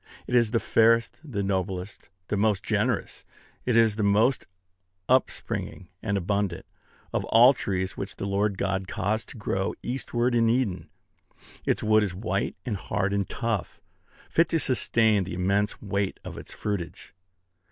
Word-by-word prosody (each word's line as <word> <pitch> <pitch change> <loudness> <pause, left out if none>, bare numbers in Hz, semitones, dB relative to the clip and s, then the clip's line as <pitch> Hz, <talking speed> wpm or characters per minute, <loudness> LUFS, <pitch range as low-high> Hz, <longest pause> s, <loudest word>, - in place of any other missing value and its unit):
It - - -6
is 120 -3 +4
the 115 +1 +1
fairest, 115 +1 +3
the 115 -10 -3
noblest, 95 0 -3 0.2
the - - 0
most 105 -1 +1
generous, - - -1 0.4
it 120 -2 +3
is 110 -2 +4
the - - 0
most 110 +6 +3 0.6
upspringing 125 -7 -1
and 100 -2 0
abundant, 100 -1 -1 0.5
of - - 0
all 120 +4 +7
trees 95 -6 -2
which - - -5
the - - -5
Lord 100 0 0
God 95 0 -1
caused 110 +3 -2
to - - -10
grow 95 -2 -2
eastward 120 -1 -1
in 115 -1 +3
Eden. 115 -6 0 0.8
Its - - +1
wood 110 0 +4
is 100 -4 -2
white 100 0 -2
and 110 -6 -2
hard 95 +1 -1
and 100 -1 -1
tough, 115 -5 -3 0.5
fit 165 0 +2
to 165 - +1
sustain 115 -6 +2
the 90 -1 -5
immense 100 +3 0
weight 100 -1 -1
of - - -7
its - - -9
fruitage. 100 -5 -5
105 Hz, 155 wpm, -26 LUFS, 95-115 Hz, 0.8 s, all